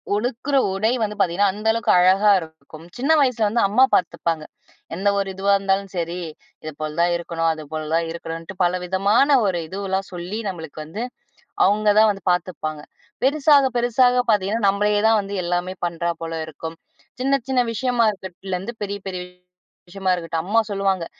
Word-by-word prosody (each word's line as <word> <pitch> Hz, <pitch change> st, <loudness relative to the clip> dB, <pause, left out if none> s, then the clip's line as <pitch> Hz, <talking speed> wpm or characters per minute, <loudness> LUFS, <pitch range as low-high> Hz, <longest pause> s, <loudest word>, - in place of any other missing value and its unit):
உடுத்துற 250 Hz, +5 st, -1 dB, 0.2 s
உடை 215 Hz, +4 st, +1 dB
வந்து 210 Hz, -1 st, -1 dB
பார்த்தீங்கன்னா, 195 Hz, +2 st, +2 dB
அந்த 210 Hz, +2 st, -5 dB
அளவுக்கு 230 Hz, -1 st, +1 dB
அழகா 190 Hz, +4 st, +4 dB
இருக்கும். 160 Hz, -1 st, -12 dB
சின்ன 270 Hz, +6 st, +1 dB
வயசுல 240 Hz, -5 st, +2 dB
வந்து 230 Hz, +3 st, +1 dB
அம்மா 215 Hz, +6 st, +4 dB
பார்த்துப்பாங்க. 165 Hz, -2 st, -1 dB, 0.5 s
என்ன 200 Hz, +3 st, +1 dB
ஒரு 200 Hz, -, -1 dB
இதுவா 200 Hz, +1 st, +2 dB
இருந்தாலும் 195 Hz, 0 st, -1 dB
சரி. 170 Hz, 0 st, -3 dB, 0.4 s
இது 155 Hz, -, -5 dB
போல 155 Hz, 0 st, -2 dB
தான் 175 Hz, 0 st, +3 dB
இருக்கணும், 165 Hz, -1 st, -1 dB
அது 155 Hz, -1 st, -8 dB
போல 155 Hz, 0 st, -3 dB
தான் 165 Hz, 0 st, +1 dB
இருக்கணும்ன்ட்டு, 165 Hz, +2 st, -7 dB
பல 180 Hz, +1 st, +1 dB
விதமான 205 Hz, +10 st, +3 dB
ஒரு 185 Hz, -3 st, 0 dB
இதுவெல்லாம் 195 Hz, +1 st, -3 dB
சொல்லி 180 Hz, +5 st, -5 dB
நம்மளுக்கு 160 Hz, -4 st, -8 dB
வந்து, 200 Hz, +9 st, -5 dB, 0.6 s
அவங்க 210 Hz, +2 st, +1 dB
தான் 220 Hz, 0 st, +6 dB
வந்து 195 Hz, -1 st, -8 dB
பார்த்துப்பாங்க. 160 Hz, -4 st, -3 dB, 0.4 s
பெருசாக 285 Hz, 0 st, +4 dB
பெருசாக 245 Hz, +1 st, +3 dB
பார்த்தீங்கன்னா, 210 Hz, +2 st, 0 dB
நம்மளையே 205 Hz, +1 st, +1 dB
தான் 225 Hz, -1 st, +4 dB
வந்து 200 Hz, 0 st, -7 dB
எல்லாமே 175 Hz, +1 st, -2 dB
பண்ணுறா 170 Hz, 0 st, -2 dB
போல 165 Hz, 0 st, -4 dB
இருக்கும். 160 Hz, +1 st, -8 dB, 0.4 s
சின்ன 275 Hz, +1 st, +2 dB
சின்ன 260 Hz, -1 st, +2 dB
விஷயமா 240 Hz, +1 st, +1 dB
இருக்கிட்லேருந்து 190 Hz, +2 st, -6 dB
பெரிய 200 Hz, 0 st, -4 dB
பெரிய 185 Hz, -1 st, -4 dB, 0.7 s
விஷயமா 190 Hz, 0 st, -1 dB
இருக்கட்டும். 165 Hz, -2 st, -3 dB
அம்மா 215 Hz, +4 st, +3 dB
சொல்லுவாங்க, 195 Hz, -3 st, 0 dB
195 Hz, 160 wpm, -22 LUFS, 170-215 Hz, 0.7 s, தான்